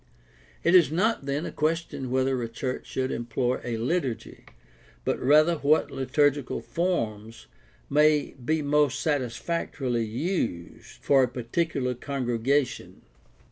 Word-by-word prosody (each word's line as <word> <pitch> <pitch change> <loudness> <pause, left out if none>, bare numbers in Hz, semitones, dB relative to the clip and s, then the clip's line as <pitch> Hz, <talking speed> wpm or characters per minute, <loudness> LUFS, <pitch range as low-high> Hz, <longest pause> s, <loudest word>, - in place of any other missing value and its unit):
It 170 - +3
is 175 -5 +6
not 185 -2 0
then 145 +4 -1
a - - -5
question 155 -4 -2
whether 130 0 +1
a 115 - -3
church 125 +2 -4
should 130 0 -2
employ 120 +2 -1
a 120 -2 -3
liturgy, 130 0 -3 0.6
but - - 0
rather 155 +5 +4
what 150 +2 +2
liturgical 140 +1 +1
forms 115 - -3 0.4
may 150 0 +3
be 155 +4 0
most 145 -1 +2
satisfactorily 130 -2 -1
used 120 - -4
for 140 -1 +5
a 130 - +3
particular 125 +2 -2
congregation. 130 +1 -1
135 Hz, 120 wpm, -26 LUFS, 120-155 Hz, 0.6 s, is